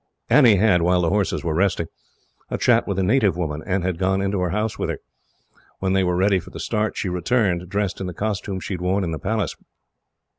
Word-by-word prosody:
Annie 125 Hz, -8 st, +7 dB
had, 95 Hz, -3 st, +3 dB
while 90 Hz, +1 st, +3 dB
the 85 Hz, -, +1 dB
horses 100 Hz, -3 st, 0 dB
were 85 Hz, -3 st, -1 dB
resting, 90 Hz, -1 st, +1 dB, 0.6 s
a -, -, -2 dB
chat -, -, +3 dB
with 100 Hz, -, -2 dB
a 95 Hz, -, +1 dB
native 100 Hz, -3 st, +2 dB
woman, 75 Hz, -4 st, -3 dB
and 95 Hz, 0 st, 0 dB
had 90 Hz, -2 st, -2 dB
gone 95 Hz, 0 st, +1 dB
into 100 Hz, 0 st, -1 dB
her 90 Hz, -1 st, 0 dB
house 105 Hz, +4 st, -2 dB
with -, -, -1 dB
her. -, -, -2 dB, 0.8 s
When 95 Hz, 0 st, -1 dB
they 95 Hz, 0 st, +3 dB
were 90 Hz, -1 st, +1 dB
ready 95 Hz, +1 st, +3 dB
for 85 Hz, -, -12 dB
the -, -, -9 dB
start, 110 Hz, -1 st, -1 dB
she -, -, -2 dB
returned, 90 Hz, -1 st, 0 dB
dressed 100 Hz, -1 st, -2 dB
in 95 Hz, -, -3 dB
the 90 Hz, -, -5 dB
costume 100 Hz, -2 st, -3 dB
she 100 Hz, -, -4 dB
had 90 Hz, -, -5 dB
worn 95 Hz, +2 st, +1 dB
in 85 Hz, -, -2 dB
the 80 Hz, -, -4 dB
Palace. 105 Hz, -3 st, -2 dB
95 Hz, 230 wpm, -22 LUFS, 90-100 Hz, 0.8 s, Annie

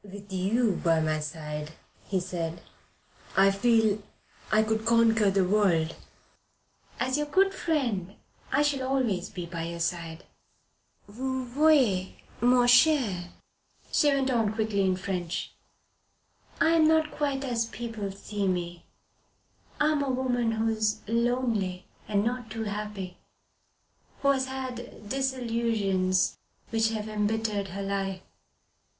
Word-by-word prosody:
"With 200 Hz, 0 st, -11 dB
you 200 Hz, +3 st, +1 dB
by 165 Hz, -1 st, +3 dB
my 155 Hz, -1 st, 0 dB
side," 150 Hz, 0 st, -6 dB, 0.5 s
said 175 Hz, -3 st, -3 dB
he, 170 Hz, -, -13 dB, 0.8 s
"I 195 Hz, +1 st, +6 dB
feel 220 Hz, 0 st, +2 dB, 0.5 s
I 215 Hz, 0 st, +5 dB
could 220 Hz, 0 st, -1 dB
conquer 225 Hz, -2 st, +4 dB
the 195 Hz, -1 st, +2 dB
earth." 170 Hz, -6 st, +2 dB, 1.1 s
"As 260 Hz, +2 st, +1 dB
your 295 Hz, -, -1 dB
good 390 Hz, +5 st, +3 dB
friend 235 Hz, -, -1 dB, 0.4 s
I 290 Hz, +3 st, +3 dB
shall 290 Hz, -2 st, +1 dB
always 240 Hz, -9 st, 0 dB
be 175 Hz, -, -6 dB
by 170 Hz, -1 st, -5 dB
your 170 Hz, 0 st, -5 dB
side. 170 Hz, -1 st, -3 dB, 0.8 s
Vous 260 Hz, +4 st, -3 dB
voyez, 250 Hz, -8 st, +3 dB, 0.3 s
mon 245 Hz, 0 st, +5 dB
cher 245 Hz, -, +4 dB
Paul," -, -, -14 dB, 0.6 s
she 295 Hz, -, +4 dB
went 270 Hz, -1 st, +1 dB
on 225 Hz, -3 st, +1 dB
quickly 215 Hz, -2 st, 0 dB
in 185 Hz, -1 st, +2 dB
French. 180 Hz, -2 st, -3 dB, 1.1 s
"I 325 Hz, -, +4 dB
am 325 Hz, -1 st, +5 dB
not 315 Hz, -1 st, +3 dB
quite 280 Hz, -2 st, -1 dB
as 235 Hz, -4 st, -1 dB
people 225 Hz, -4 st, -5 dB
see 200 Hz, +1 st, -3 dB
me. 175 Hz, -2 st, -3 dB, 0.9 s
I 300 Hz, +1 st, +4 dB
am 300 Hz, -2 st, +1 dB
a 280 Hz, -, -1 dB
woman 245 Hz, -3 st, 0 dB
who 220 Hz, 0 st, 0 dB
is 215 Hz, -1 st, 0 dB
lonely 230 Hz, -5 st, 0 dB, 0.2 s
and 205 Hz, -1 st, +1 dB
not 245 Hz, -1 st, -2 dB
too 225 Hz, +1 st, -4 dB
happy, 205 Hz, -3 st, -5 dB, 1.1 s
who 280 Hz, -, +4 dB
has 265 Hz, -1 st, +2 dB
had 250 Hz, -4 st, -7 dB
disillusions 230 Hz, -7 st, 0 dB, 0.3 s
which 225 Hz, -1 st, +2 dB
have 220 Hz, -1 st, -3 dB
embittered 215 Hz, -1 st, -1 dB
her 195 Hz, +2 st, -5 dB
life. 195 Hz, -1 st, -2 dB
220 Hz, 130 wpm, -28 LUFS, 190-250 Hz, 1.1 s, I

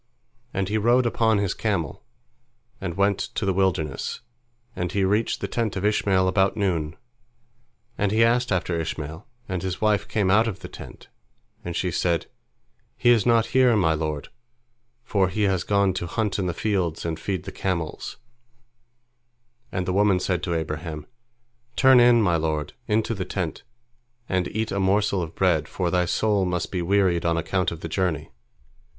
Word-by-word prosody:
And 95 Hz, -1 st, -1 dB
he 110 Hz, +2 st, 0 dB
rode 120 Hz, +4 st, +3 dB
upon 115 Hz, -2 st, +2 dB
his 100 Hz, -2 st, 0 dB
camel, 90 Hz, -, -2 dB, 0.8 s
and 85 Hz, -2 st, -4 dB
went 100 Hz, 0 st, +2 dB
to 110 Hz, -, -3 dB
the 95 Hz, -, +1 dB
wilderness, 90 Hz, -7 st, -1 dB, 0.5 s
and 90 Hz, -1 st, -2 dB
he 100 Hz, 0 st, +1 dB
reached 105 Hz, +4 st, +1 dB
the -, -, -2 dB
tent 115 Hz, -4 st, -2 dB
of 95 Hz, +1 st, -2 dB
Ishmael 95 Hz, -3 st, +2 dB
about 95 Hz, +3 st, +2 dB
noon. 85 Hz, -6 st, -1 dB, 1.0 s
And 100 Hz, -1 st, +1 dB
he 110 Hz, +2 st, +4 dB
asked 120 Hz, +1 st, +2 dB
after 90 Hz, -2 st, 0 dB
Ishmael, 80 Hz, +1 st, -5 dB, 0.2 s
and 95 Hz, -2 st, -3 dB
his 95 Hz, 0 st, -3 dB
wife 105 Hz, -2 st, +1 dB
came 100 Hz, -3 st, +1 dB
out 110 Hz, +3 st, +4 dB
of 100 Hz, -4 st, -5 dB
the -, -, -7 dB
tent, -, -, -12 dB, 0.5 s
and 85 Hz, -1 st, -5 dB
she 90 Hz, 0 st, -1 dB
said, 85 Hz, -1 st, 0 dB, 0.7 s
"He 120 Hz, -, +4 dB
is 115 Hz, -3 st, +3 dB
not 115 Hz, -1 st, +4 dB
here, 130 Hz, -3 st, +5 dB
my 85 Hz, -6 st, +3 dB
lord, 75 Hz, -2 st, -3 dB, 0.7 s
for 100 Hz, -5 st, +1 dB
he 105 Hz, +3 st, -1 dB
has 95 Hz, -4 st, +1 dB
gone 100 Hz, -2 st, +2 dB
to 85 Hz, -, -3 dB
hunt 105 Hz, +3 st, -1 dB
in 95 Hz, -, -1 dB
the 85 Hz, -, -1 dB
fields 90 Hz, -7 st, -1 dB
and 80 Hz, -1 st, -3 dB
feed 95 Hz, -1 st, -3 dB
the -, -, -7 dB
camels," 85 Hz, -5 st, -3 dB, 1.5 s
and 90 Hz, -1 st, -2 dB
the 90 Hz, -, -1 dB
woman 100 Hz, -1 st, +3 dB
said 90 Hz, -1 st, -1 dB
to 85 Hz, -2 st, -2 dB
Abraham, 80 Hz, -1 st, -4 dB, 0.7 s
"Turn 130 Hz, -1 st, +6 dB
in, 120 Hz, -1 st, +6 dB
my 90 Hz, -4 st, +3 dB
lord, 75 Hz, -2 st, -2 dB
into 110 Hz, +1 st, +1 dB
the 95 Hz, -4 st, -3 dB
tent, 90 Hz, -3 st, -4 dB, 0.7 s
and 95 Hz, -1 st, 0 dB
eat 110 Hz, 0 st, -3 dB
a 100 Hz, -, -1 dB
morsel 100 Hz, 0 st, +2 dB
of 80 Hz, -2 st, -6 dB
bread, 85 Hz, -6 st, +2 dB
for 90 Hz, -2 st, -2 dB
thy 90 Hz, -1 st, +2 dB
soul 105 Hz, +2 st, +1 dB
must 90 Hz, -1 st, -2 dB
be 90 Hz, -, -1 dB
wearied 90 Hz, -1 st, +2 dB
on 85 Hz, -1 st, +1 dB
account 90 Hz, +3 st, 0 dB
of 85 Hz, -1 st, -8 dB
the -, -, -4 dB
journey." 80 Hz, -3 st, -2 dB
95 Hz, 175 wpm, -24 LUFS, 85-105 Hz, 1.5 s, Turn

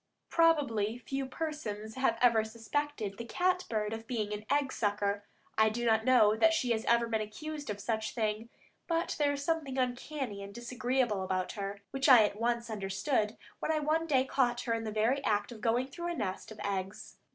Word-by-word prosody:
Probably 275 Hz, -10 st, +3 dB
few 270 Hz, +2 st, -4 dB
persons 255 Hz, -8 st, -4 dB
have 260 Hz, -3 st, +1 dB
ever 230 Hz, -3 st, +5 dB
suspected 225 Hz, -1 st, -3 dB
the -, -, -3 dB
cat 365 Hz, +9 st, 0 dB
bird 215 Hz, -1 st, -1 dB
of 225 Hz, 0 st, -7 dB
being 215 Hz, -5 st, -2 dB
an 210 Hz, +1 st, -6 dB
egg 280 Hz, -1 st, +1 dB
sucker; 205 Hz, -1 st, 0 dB, 0.3 s
I 220 Hz, 0 st, +6 dB
do 240 Hz, +2 st, -3 dB
not 220 Hz, -1 st, +3 dB
know 230 Hz, -5 st, +6 dB
that 325 Hz, +9 st, +4 dB
she 250 Hz, -6 st, 0 dB
has 220 Hz, -1 st, +1 dB
ever 235 Hz, 0 st, +4 dB
been 225 Hz, -1 st, -1 dB
accused 290 Hz, +7 st, -6 dB
of 205 Hz, -1 st, -3 dB
such 220 Hz, +1 st, -1 dB
a -, -, -11 dB
thing, 220 Hz, 0 st, -1 dB, 0.4 s
but 335 Hz, 0 st, 0 dB
there 290 Hz, -1 st, +3 dB
is 280 Hz, 0 st, -4 dB
something 295 Hz, -4 st, -1 dB
uncanny 250 Hz, -3 st, -2 dB
and 200 Hz, 0 st, -9 dB
disagreeable 245 Hz, -3 st, 0 dB
about 185 Hz, -1 st, -1 dB
her, 200 Hz, -1 st, -5 dB
which 270 Hz, +1 st, +1 dB
I 245 Hz, -4 st, +9 dB
at 210 Hz, 0 st, -1 dB
once 235 Hz, 0 st, 0 dB
understood, 210 Hz, +3 st, -1 dB, 0.2 s
when -, -, -1 dB
I 315 Hz, -, +2 dB
one 310 Hz, +2 st, +1 dB
day 265 Hz, -4 st, +3 dB
caught 245 Hz, -3 st, +1 dB
her 235 Hz, -, -1 dB
in 225 Hz, 0 st, -2 dB
the 215 Hz, -, -3 dB
very 230 Hz, +6 st, +1 dB
act 205 Hz, +1 st, 0 dB
of 225 Hz, -3 st, -10 dB
going 240 Hz, +2 st, +2 dB
through 345 Hz, +6 st, -6 dB
a 345 Hz, -, -2 dB
nest 190 Hz, +3 st, -3 dB
of 220 Hz, -, -10 dB
eggs. 190 Hz, -1 st, -4 dB
235 Hz, 205 wpm, -32 LUFS, 215-270 Hz, 0.4 s, I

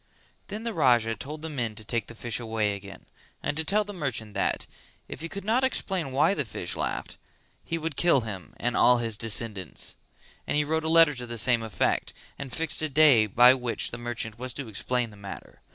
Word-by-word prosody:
Then 210 Hz, +3 st, -6 dB
the 230 Hz, -1 st, -3 dB
Raja 120 Hz, -7 st, +3 dB
told 150 Hz, +9 st, -7 dB
the -, -, -3 dB
men 120 Hz, -7 st, -3 dB
to 110 Hz, -, -8 dB
take 115 Hz, +1 st, -1 dB
the 115 Hz, -, -10 dB
fish 115 Hz, 0 st, -1 dB
away 110 Hz, -3 st, 0 dB
again, 100 Hz, 0 st, -10 dB, 0.4 s
and -, -, -1 dB
to 160 Hz, -, 0 dB
tell 205 Hz, +6 st, +2 dB
the 205 Hz, 0 st, -8 dB
merchant 130 Hz, -, -3 dB
that, -, -, 0 dB, 0.4 s
if -, -, -8 dB
he 165 Hz, -, -5 dB
could 200 Hz, +2 st, -6 dB
not 235 Hz, +5 st, +2 dB
explain 190 Hz, -, -1 dB
why 150 Hz, +8 st, +3 dB
the 150 Hz, -, -1 dB
fish 90 Hz, -7 st, -4 dB
laughed, -, -, -3 dB, 0.5 s
he 165 Hz, -, -2 dB
would 165 Hz, -2 st, -4 dB
kill 170 Hz, -5 st, +4 dB
him 100 Hz, -5 st, -7 dB
and 120 Hz, 0 st, -1 dB
all 125 Hz, 0 st, +6 dB
his 115 Hz, -2 st, 0 dB
descendants; 105 Hz, -4 st, -1 dB, 0.5 s
and -, -, 0 dB
he 150 Hz, -, +3 dB
wrote 160 Hz, +2 st, -1 dB
a -, -, 0 dB
letter 165 Hz, -2 st, +6 dB
to 125 Hz, -2 st, -7 dB
the 120 Hz, 0 st, -5 dB
same 120 Hz, +1 st, +3 dB
effect, 110 Hz, -4 st, 0 dB, 0.3 s
and 140 Hz, -2 st, -6 dB
fixed 160 Hz, +5 st, -1 dB
a 155 Hz, -, 0 dB
day 140 Hz, -7 st, +6 dB
by 120 Hz, +5 st, +7 dB
which 125 Hz, -3 st, -2 dB
the 115 Hz, -, -6 dB
merchant 120 Hz, -2 st, -4 dB
was 125 Hz, -1 st, -4 dB
to 140 Hz, -2 st, -5 dB
explain 120 Hz, +3 st, -1 dB
the 105 Hz, -, -14 dB
matter. 100 Hz, -1 st, -10 dB
125 Hz, 215 wpm, -27 LUFS, 115-155 Hz, 0.5 s, by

